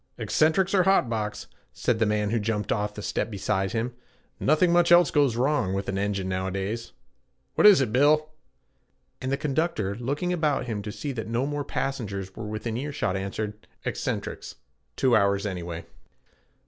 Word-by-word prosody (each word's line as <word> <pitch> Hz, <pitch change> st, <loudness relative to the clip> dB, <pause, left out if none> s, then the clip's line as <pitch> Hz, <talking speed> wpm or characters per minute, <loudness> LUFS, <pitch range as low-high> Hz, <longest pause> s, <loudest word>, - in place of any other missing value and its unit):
'Eccentrics 180 Hz, +5 st, +2 dB
or 190 Hz, -, +5 dB
hot 180 Hz, -10 st, +3 dB
box,' 105 Hz, -2 st, -3 dB, 0.3 s
said 115 Hz, -2 st, 0 dB
the 110 Hz, -, +3 dB
man 105 Hz, 0 st, 0 dB
who 115 Hz, -, +1 dB
jumped 105 Hz, 0 st, -2 dB
off 105 Hz, 0 st, -1 dB
the 105 Hz, -, -7 dB
step 105 Hz, -, -1 dB
beside 95 Hz, -2 st, -1 dB
him. 115 Hz, +2 st, -1 dB, 0.5 s
'Nothing 155 Hz, +4 st, +3 dB
much 175 Hz, 0 st, +4 dB
else 175 Hz, 0 st, +7 dB
goes 140 Hz, -6 st, +3 dB
wrong 125 Hz, -6 st, +1 dB
with 100 Hz, 0 st, -3 dB
an 95 Hz, 0 st, -1 dB
engine 100 Hz, -2 st, -1 dB
nowadays. 95 Hz, +4 st, -3 dB, 0.6 s
What -, -, +6 dB
is 200 Hz, -8 st, +8 dB
it, 115 Hz, -5 st, -1 dB
Bill?' 150 Hz, +4 st, +4 dB, 0.9 s
And 130 Hz, +1 st, -2 dB
the 140 Hz, -, +1 dB
conductor, 145 Hz, -, -1 dB
looking 140 Hz, -, -2 dB
about 155 Hz, -6 st, 0 dB
him 110 Hz, -4 st, -3 dB
to 105 Hz, +1 st, -5 dB
see 140 Hz, +6 st, -4 dB
that 115 Hz, -4 st, -5 dB
no 115 Hz, +3 st, 0 dB
more 145 Hz, 0 st, -2 dB
passengers 100 Hz, -10 st, -4 dB
were 110 Hz, -, -6 dB
within 110 Hz, +2 st, -3 dB
earshot, 140 Hz, -7 st, -2 dB
answered, 105 Hz, +2 st, -4 dB, 0.2 s
'Eccentrics -, -, -4 dB, 0.4 s
two 130 Hz, -, +3 dB
hours 100 Hz, -1 st, +2 dB
anyway.' 85 Hz, -4 st, -5 dB
115 Hz, 170 wpm, -26 LUFS, 100-145 Hz, 0.9 s, is